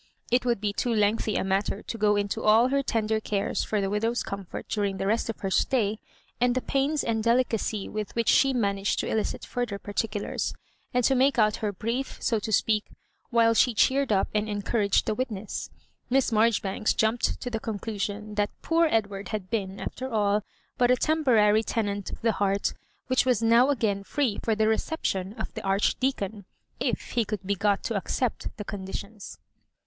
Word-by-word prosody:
It 250 +1 +3
would 235 -4 +1
l^ 205 -1 -1
too 245 - 0
lengthy 215 0 +1
a - - +1
matter 195 +2 -1
to - - -5
go 210 0 +3
into 205 -1 -1
all 225 +4 +5
her 275 +1 +2
tender 220 -4 0
cares 205 -2 -1
for 215 - -1
the 195 - 0
widow's 225 +3 0
comfort 195 -2 -6
during 200 -2 -1
the 195 - -2
rest 220 +3 0
of 225 - -5
her 195 - -2
stay, 220 -2 +1 0.4
and 245 0 +2
the 255 - +1
pains 280 +2 0
and 225 -1 0
delicacy 230 -3 +1
with 215 -1 -5
which 230 -1 0
she 270 +4 +5
managed 200 -5 0
to - - -4
elicit 220 - -2
further 240 -5 -3
particulars, 205 +1 -3 0.4
and 250 -1 +1
to 270 - +4
make 265 +1 +3
out 215 -2 +3
her 210 -2 -2
brief, 230 +7 -3
so 225 -3 +1
to 220 - -5
speak, 215 0 +2 0.4
while 230 -1 +4
she 235 +1 +3
cheered 270 +2 +3
up 195 -2 +3
and 215 0 0
encouraged 205 0 +1
the - - 0
witness. 215 -4 -4 0.4
Miss 265 0 +2
Marjoribanks 215 -2 +2
jumped 220 +2 +1
to 245 - -5
the 225 - -2
con 220 -1 -4
clusion 210 0 -4
that 205 0 +2
"poor 330 0 +3
Edward" 200 -4 -1
had 210 -3 -4
been, 200 -4 -2
after 260 +1 -5
all, 210 -1 +2 0.4
but 245 -1 +4
a 250 - +6
temporary 235 -8 +3
tenant 205 -3 -2
of - - -7
the 230 - +4
heart, 200 -1 0 0.3
which 255 -1 +2
was 245 -3 +1
now 235 +4 +5
again 215 -7 0
free 245 -1 -1
for 225 - +1
the 215 0 +2
reception 210 -5 -1
of 220 -1 -6
the - - -5
Archdea 210 +7 +1
con, 200 0 -5 0.3
if - - -2
he 235 - +2
could 210 -2 -5
be 200 - +1
got 200 +1 +1
to 230 - -2
accept 230 +4 -1
the 210 - -6
conditions. 200 +1 -7
215 Hz, 195 wpm, -27 LUFS, 205-240 Hz, 0.4 s, a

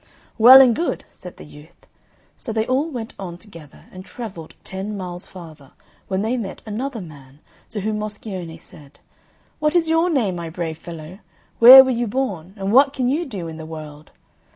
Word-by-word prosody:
"Well 255 +4 +10
and 245 -4 +4
good!" 340 - -3
said 180 -2 -12
the - - -11
youth. 150 +1 -17 0.5
So 235 - -6
they 220 0 -1
all 270 +6 0
went 240 -6 -7
on 175 -3 -7
together 165 -8 -15
and 185 0 -10
travelled 190 -7 -9
ten 195 +2 -6
miles 180 -2 -7
farther, 160 -7 -13 0.3
when 190 +1 -2
they 235 +3 -1
met 210 -5 -7
another 230 +3 -5
man, 140 -5 -14 0.3
to 210 - -5
whom 215 +1 -2
Moscione 200 -6 -7
said, 145 -3 -13 0.6
"What 300 +2 0
is 330 -2 +2
your 325 +2 +2
name, 225 - 0
my 170 -1 -6
brave 160 -1 -5
fellow? 165 +2 -10 0.4
Where 255 +3 +11
were 260 - -1
you 240 -1 -1
born? 200 -7 -4
And 195 0 -3
what 275 +2 +5
can 250 -3 -1
you 315 +5 -1
do 195 -9 -6
in 160 -1 -8
the 160 - -8
world?" 155 -2 -10
200 Hz, 185 wpm, -21 LUFS, 165-250 Hz, 0.6 s, Where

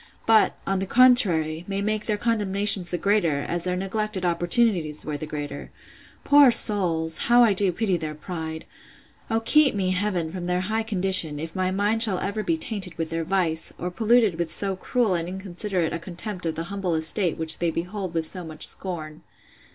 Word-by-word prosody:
—But, 225 -1 +3
on 195 -1 -1
the 190 - -3
contrary, 180 -11 +3
may 195 0 -3
make 215 +1 -2
their 210 -2 0
condemnations 205 -4 +2
the 175 - -2
greater, 175 -8 0
as 170 +4 -4
their 180 0 -1
neglected 195 0 -3
opportunities 175 -2 0
were 150 - -4
the 155 +1 -6
greater? 145 -1 -7 0.5
Poor 285 -2 +6
souls! 175 -8 +4
how 240 +1 +6
do 195 +1 +3
I - - +2
pity 190 0 -1
their 155 -2 -6
pride!—O 160 +7 -8
keep 300 +1 +3
me, 190 -2 -1
Heaven! 185 -4 -2
from 175 -1 -6
their 180 0 -1
high 215 +4 -2
condition, 185 -8 +3
if 160 +1 -7
my 185 -1 -1
mind 205 +4 -1
shall 210 -5 +3
ever 200 +3 -3
be 325 +9 -1
tainted 205 - -3
with 165 -1 -4
their 165 0 -2
vice! 165 -2 -1
or 180 +1 -5
polluted 220 -3 +2
with 170 -1 -2
so 195 +3 -2
cruel 225 +2 -1
and 170 -1 -2
inconsiderate 185 -1 -3
a 170 - -3
contempt 180 +1 -6
of 160 - -3
the 165 - -4
humble 190 -4 -2
estate 165 +3 +3
which 160 0 +1
they 170 - 0
behold 180 +2 -5
with 165 -1 -1
so 180 +2 -6
much 155 -1 -2
scorn! 155 -5 -4
185 Hz, 190 wpm, -24 LUFS, 165-210 Hz, 0.5 s, Poor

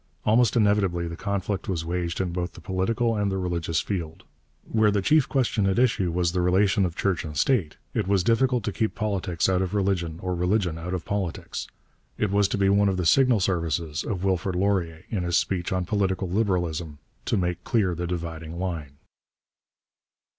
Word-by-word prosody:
Almost 115 +2 +4
inevitably 100 -6 +2
the 85 - -5
conflict 100 +1 -3
was 85 -4 -2
waged 85 -1 -2
in 90 -2 -1
both 90 0 -3
the - - -12
political 110 +5 0
and 105 -2 0
the 95 - -1
religious 85 -3 -1
field. 85 -5 -4 0.4
Where 110 -1 +3
the 100 -1 +1
chief 150 +4 +3
question 115 -7 +1
at 95 - +1
issue 110 -8 +2
was 85 0 +1
the 90 0 0
relation 95 +2 +3
of 85 - -8
church 95 -3 0
and 75 -3 -6
state, 90 - +1 0.2
it - - -1
was 100 -2 +2
difficult 125 +2 +2
to 105 - -1
keep 110 +3 -1
politics 95 -5 -1
out 95 -1 +2
of 95 +2 -2
religion 95 -5 0
or 90 -1 -1
religion 90 -1 0
out 90 +2 -3
of 90 - -5
politics. 100 -5 -3 0.5
It 105 -3 0
was 100 0 +3
to 100 - -2
be 100 -1 +2
one 100 +1 +4
of 95 - -1
the 90 - -1
signal 125 +2 +4
services 85 -3 -1
of 95 -5 -3
Wilfrid 95 -1 0
Laurier, 90 -4 0
in 105 -5 -1
his 85 -1 +1
speech 90 -2 -1
on 90 -1 0
Political 95 -1 0
Liberalism, 90 -6 -1 0.3
to - - +1
make 90 -1 -1
clear 100 -7 +1
the 85 +1 -3
dividing 85 -1 -5
line. 80 -6 -4
95 Hz, 190 wpm, -25 LUFS, 85-100 Hz, 0.5 s, Almost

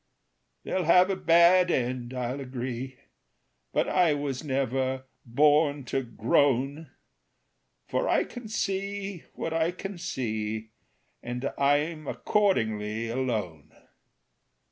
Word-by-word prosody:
"They'll 185 -2 -1
have 180 +3 +5
a - - 0
bad 175 +1 +5
end, 125 -4 -1
I'll 125 +1 -3
agree, 130 0 -5 0.7
But - - +1
I 175 -5 +3
was 140 -2 -3
never 130 -1 -1 0.2
born 145 +2 +3
to 135 - +2
groan; 135 +5 +1 1.0
For - - 0
I - - +3
can 245 -3 -9
see 200 -2 -3
what 165 - -3
I 165 0 +2
can 185 +1 -6
see, 110 -7 -3 0.5
And 125 +3 -4
I'm 145 +2 +1
accordingly 115 - 0
alone. 110 - -3
140 Hz, 105 wpm, -27 LUFS, 125-170 Hz, 1.0 s, have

